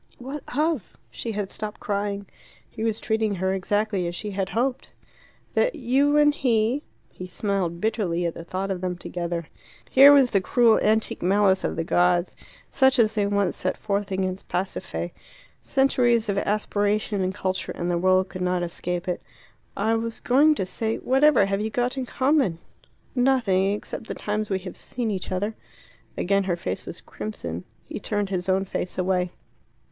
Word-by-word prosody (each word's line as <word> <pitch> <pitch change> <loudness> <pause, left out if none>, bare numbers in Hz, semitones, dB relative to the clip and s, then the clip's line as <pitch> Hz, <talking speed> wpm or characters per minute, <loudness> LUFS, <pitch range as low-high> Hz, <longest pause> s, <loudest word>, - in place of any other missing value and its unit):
"What 270 +4 -6 0.2
of?" 305 - 0
She 225 - -5
had 205 -2 -2
stopped 210 0 -5
crying. 200 -1 -2 0.4
He 220 - -7
was 225 -1 0
treating 220 -2 0
her 190 +1 0
exactly 200 -1 0
as 175 - -4
she 210 +3 -5
had 195 -1 -2
hoped. 250 +3 -1 0.6
"That - - +2
you 280 +3 +2
and 295 0 +5
he 240 -1 +1 0.2
" - - -39
He 185 - -8
smiled 180 -3 -1
bitterly 180 -5 0
at 170 - -1
the 170 - -8
thought 190 +3 -3
of 185 -2 -3
them 180 -1 -2
together. 170 -1 -4 0.5
Here 275 +2 +9
was 275 -3 +6
the 195 - +3
cruel 230 +3 +4
antique 220 +1 +1
malice 190 +1 +3
of - - -1
the 165 - -1
gods, 175 +1 +2 0.4
such 265 0 +4
as 220 -2 +4
they 205 -2 +1
once 200 -2 +1
sent 185 - -2
forth 200 -1 -2
against 190 0 -2
Pasiphae. 180 -1 -3 0.5
Centuries 240 -5 +2
of 200 - 0
aspiration 205 0 0
and 185 0 -1
culture 185 -2 -2
and 175 +1 -2
the 170 - +1
world 185 +1 +3
could 180 +1 -7
not 180 -1 0
escape 175 +1 -3
it. 180 - -2 0.6
"I 220 +3 +2
was 225 0 -2
going 290 +5 +4
to 190 - -1
say 220 +4 -2
whatever 265 -4 +4
have 195 +1 -1
you 220 - -1
got 245 +3 0
in 260 -2 -3
common?" 260 - +2 0.6
"Nothing 240 -7 +2
except 210 +1 -6
the - - -4
times 210 0 -2
we 195 - +1
have 185 - -7
seen 240 -3 -3
each 190 -2 -4
other." 205 +4 -1 0.6
Again 200 +1 +1
her 180 -2 +1
face 95 - -5
was - - -7
crimson. 90 -5 -6 0.2
He - - -6
turned 205 -1 -2
his 185 0 -2
own 190 +1 +2
face 180 - -4
away. 180 -1 0
200 Hz, 180 wpm, -25 LUFS, 185-230 Hz, 0.6 s, Here